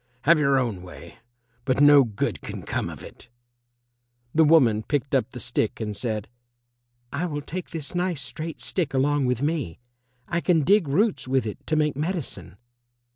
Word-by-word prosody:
Have 165 +1 +5
your 140 -2 +3
own 115 -8 -1
way, 90 +2 -12 0.4
but 130 0 0
no 145 -1 +8
good 110 -5 -3
can - - -7
come - - -2
of - - -9
it." - - -13 1.0
The 160 - +5
woman 135 -9 +5
picked 140 +3 -2
up 130 -3 +2
the 125 - -9
stick 115 -3 -1
and 105 -2 -3
said, 110 -1 -3 0.9
"I 165 +6 -1
will 145 -3 -4
take 180 +4 -6
this 155 -4 -4
nice 175 -5 -1
straight 155 +5 -6
stick 160 -7 -2
along 145 +1 +2
with 125 +1 0
me. 145 - -1 0.5
I 170 0 -1
can 170 -4 +3
dig 195 0 +4
roots 155 - +1
with 130 -1 +1
it 105 - -5
to 155 - +1
make 150 -2 +1
medicine." 150 - -3
140 Hz, 175 wpm, -25 LUFS, 120-160 Hz, 1.0 s, no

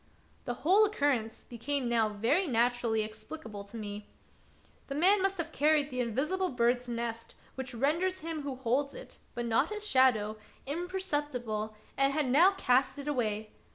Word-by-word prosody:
The 245 - -2
whole 390 +6 +6
occurrence 285 - 0
became 255 +3 -2
now 230 -2 +2
very 235 - +1
natu 245 -1 +1
rally 220 -1 +1
explicable 215 0 -8
to 205 +3 -10
me. 205 -1 -6 0.8
The 275 - -4
man 380 +6 +5
must 390 0 +1
have 330 -1 -4
carried 300 -1 +2
the 255 - -3
invisible 300 - 0
bird's 245 0 +1
nest 230 -1 -4 0.2
which 265 -1 -6
renders 335 +9 0
him 320 -1 -4
who 280 -2 -4
holds 265 +3 -1
it, - - -10 0.2
but 240 - -2
not 230 +6 +2
his 425 0 -4
shadow, 235 - +3 0.3
imperceptible, 290 - -3 0.2
and 275 0 +3
had 295 -3 0
now 355 +8 +6
cast 260 -1 +2
it 285 0 -7
away. 220 -6 -1
260 Hz, 160 wpm, -31 LUFS, 230-310 Hz, 0.8 s, whole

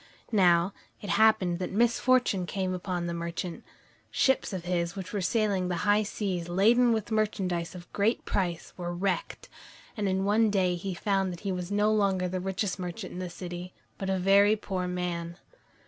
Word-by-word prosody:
Now, 180 -3 +4 0.3
it 205 - -4
happened 200 -5 +3
that 185 - -3
misfortune 235 -3 +2
came 185 0 -2
upon 180 -1 -3
the 170 - -2
merchant. 170 +1 -4 0.5
Ships 265 -3 +2
of 185 -3 -4
his 175 0 -1
which 190 -1 -7
were 205 - -1
sailing 195 -1 +1
the 180 - -1
high 205 +1 +4
seas 190 -5 -3
laden 230 +7 +4
with 220 0 -1
merchandise 190 -5 -1
of 175 -1 -12
great 210 +4 +1
price, 175 -4 -2
were 175 -1 -4
wrecked, 185 -1 -2 0.5
and 205 -4 -1
in 190 +1 0
one 215 +2 +3
day 190 -3 +2
he 180 +1 -4
found 195 0 0
that 175 - -8
he 200 - -2
was 180 0 -4
no 210 +1 +3
longer 195 -3 +2
the 185 +1 -3
richest 190 +1 -2
merchant 180 +2 -5
in 180 - -6
the 180 -1 -4
city, 175 +1 -7 0.3
but 195 - -3
a 190 - +1
very 200 +3 +5
poor 190 -3 -3
man. 175 -1 -3
190 Hz, 180 wpm, -28 LUFS, 175-205 Hz, 0.5 s, very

